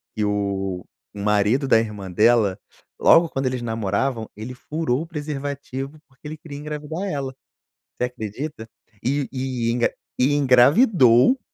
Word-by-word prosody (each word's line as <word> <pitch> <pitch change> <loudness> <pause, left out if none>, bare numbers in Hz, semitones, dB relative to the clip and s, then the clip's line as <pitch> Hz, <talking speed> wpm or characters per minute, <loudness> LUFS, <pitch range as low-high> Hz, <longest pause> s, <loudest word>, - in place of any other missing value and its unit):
que 110 - -1
o 100 -3 -2 0.3
o 100 - -7
marido 105 +6 +2
da 115 - +5
irmã 105 -4 -5
dela, 110 0 +3 0.4
logo 165 0 +6
quando 135 -2 -3
eles 130 -1 -2
namoravam, 115 +1 -2
ele 110 +4 -7
furou 150 0 -2
o 165 - -6
preservativo 145 -2 -5
porque 135 +2 -14
ele 155 - -6
queria 150 -3 -9
engravidar 150 +4 -5
ela, 140 -6 -3 0.6
você - - -2
acredita? 120 +1 -6 0.3
E 130 -3 -1
engra 120 0 +1 0.3
e 135 +3 +3
engravidou, 140 - +5
130 Hz, 135 wpm, -22 LUFS, 110-145 Hz, 0.6 s, logo